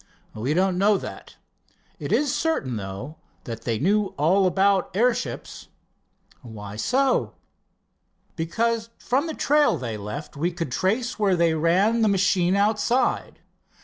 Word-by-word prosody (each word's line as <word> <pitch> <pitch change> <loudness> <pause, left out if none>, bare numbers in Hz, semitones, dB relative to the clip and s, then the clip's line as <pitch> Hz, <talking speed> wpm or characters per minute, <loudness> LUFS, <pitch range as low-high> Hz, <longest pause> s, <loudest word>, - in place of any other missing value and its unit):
"We 125 +8 -2
don't 185 0 +1
know 205 +1 +4
that. - - -9 0.6
It - - -5
is 290 -3 +2
certain, 225 - -1
though, 100 +10 -7 0.3
that 115 -1 -7
they 115 -2 0
knew 200 - +1
all 185 +6 +3
about 195 0 +2
airships." 240 +2 -1 0.7
"Why 105 -5 -9
so?" 260 - +1 1.0
"Because 225 +7 -1
from 275 +6 0
the 320 - -4
trail 295 - +3
they 115 -5 -4
left 105 +10 -7
we 165 +5 -1
could 165 -5 -5
trace 225 - -1
where 200 -3 +3
they 170 -1 +2
ran 185 +9 +2
the 220 - +4
machine 185 -2 +2
outside. 215 +5 0
185 Hz, 135 wpm, -24 LUFS, 150-225 Hz, 1.0 s, know